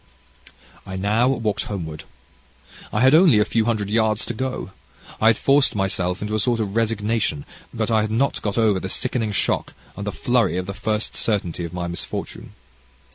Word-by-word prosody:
"I 95 - -7
now 105 +6 +2
walked 115 -6 0
homeward. 80 -7 -6 0.9
I - - 0
had 130 +2 +6
only 160 - +6
a 105 - +4
few 115 -1 +1
hundred 105 -3 -1
yards 110 -1 +1
to - - -4
go. 130 -4 -4 0.5
I 110 - +4
had 115 - +5
forced 140 -3 +3
myself 95 -1 -1
into 105 +1 -3
a 110 - +1
sort 120 +2 +1
of 105 -2 -3
resignation, 110 -7 0 0.3
but 115 0 -2
I 110 -1 +4
had 110 - -1
not 120 +6 0
got 105 0 -2
over 110 -4 +3
the 95 - -5
sickening 120 -1 -1
shock 100 - -1 0.2
and 100 +1 -6
the - - 0
flurry 115 -3 +1
of 90 - -2
the 100 - -5
first 110 +2 -2
certainty 90 -6 -1
of 85 - -8
my 90 -1 -3
misfortune. 85 0 -6
110 Hz, 185 wpm, -22 LUFS, 95-115 Hz, 0.9 s, had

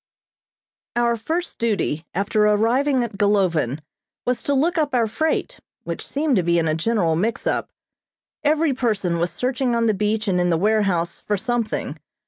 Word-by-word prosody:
Our 240 0 +2
first 325 +10 -3
duty 200 -8 -1
after 205 +3 +1
arriving 245 +6 +2
at 210 -4 -6
Golovin 175 - +1 0.4
was 250 -1 0
to 285 - 0
look 325 +5 +2
up 290 -4 0
our 235 -2 +3
freight, 315 - -1 0.2
which - - -5
seemed 285 -3 0
to - - +4
be 170 0 +2
in 165 -1 +1
a 155 - +1
general 170 -1 +1
mix 215 +8 -1
up. - - -1 0.7
Each 300 -1 +2
person 200 -9 0
was 175 +1 0
searching 255 -1 -1
on 230 0 +2
the 220 - +3
beach 210 +2 -1
and 180 -2 +2
in 175 - +1
the 165 - +2
warehouse 195 -4 +1
for 210 - -1
something. 220 - -2
220 Hz, 170 wpm, -22 LUFS, 180-250 Hz, 0.7 s, to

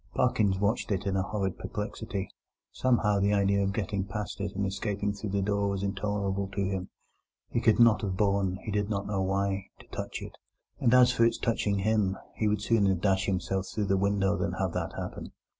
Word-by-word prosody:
Parkins 110 -6 +2
watched 105 +4 0
it 95 -1 -1
in 100 -1 0
a 95 - +2
horrid 95 -1 -2
perplexity. 105 -2 -4 0.4
Somehow, 115 -5 +2
the 100 +1 +2
idea 100 0 +2
of 100 0 +1
getting 100 -1 -2
past 105 0 -5
it 100 -1 -3
and 100 +1 0
escaping 100 +1 -2
through 100 +1 -5
the 100 0 0
door 100 0 +1
was 100 0 -2
intolerable 100 -1 -1
to 100 - 0
him; 95 -1 -3 0.6
he 120 - 0
could 110 0 +4
not 115 -2 +6
have 95 -3 -2
borne—he 100 0 0
didn't 105 -1 -1
know 100 -2 -1
why—to 95 0 -2
touch - - -4
it; - - -10 0.4
and 115 - +3
as 125 0 +7
for 125 -2 +2
its 115 - +3
touching 105 -4 0
him, 100 -1 +1 0.2
he 110 - 0
would 105 0 0
sooner 100 -4 +3
dash 95 +1 +1
himself 95 0 -1
through 105 - -2
the 95 0 +2
window 100 0 +2
than 90 -1 -1
have 95 -2 -1
that - - -3
happen. - - -6
100 Hz, 195 wpm, -29 LUFS, 95-105 Hz, 0.6 s, as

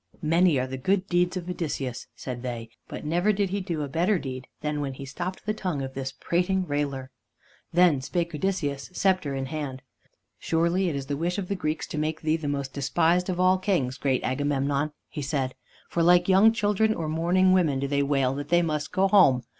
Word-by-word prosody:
"Many 165 -1 +4
are 130 - 0
the 130 0 -6
good 190 +7 +1
deeds 180 0 +1
of 175 -1 -6
Odysseus," 145 -8 -4
said 125 -2 -6
they, 120 -2 -5 0.2
"but - - -7
never 175 +7 +2
did 200 -2 0
he 200 0 -1
do 170 -5 -3
a - - -3
better 175 +8 +1
deed 130 -4 -6
than 150 -1 -2
when 135 -2 -3
he 135 - -7
stopped 175 +7 -5
the 215 - 0
tongue 180 -10 -3
of 135 0 -6
this 135 0 -4
prating 180 +6 0
railer." 140 -3 -2 0.6
Then 170 -6 +4
spake 170 +4 -2
Odysseus, 150 -5 -2
scepter 185 -8 +1
in 135 0 -2
hand. 135 -2 -5 0.6
"Surely 170 +3 +1
it 155 - -3
is 140 -1 -3
the 145 - -2
wish 175 +4 -1
of 190 -3 -4
the 200 - 0
Greeks 155 -3 -2
to 155 - -4
make 155 +1 -2
thee 155 0 +1
the 160 -2 -4
most 140 -2 -3
despised 170 +6 +1
of 180 -1 -2
all 185 0 +4
kings, 140 -10 0
great 130 -2 0
Agamemnon," 140 +2 0 0.2
he 150 - -6
said, 135 -2 -1 0.3
"for 170 - -1
like 175 +1 +5
young 195 +4 +6
children 215 0 +1
or 160 - -3
mourning 175 +4 +3
women 160 -8 +2
do 140 - -1
they 140 0 +1
wail 135 -2 +1
that 145 +1 -5
they 175 +1 +4
must 155 -2 -2
go 195 +1 +3
home. 180 -11 +5
155 Hz, 210 wpm, -26 LUFS, 140-180 Hz, 0.6 s, young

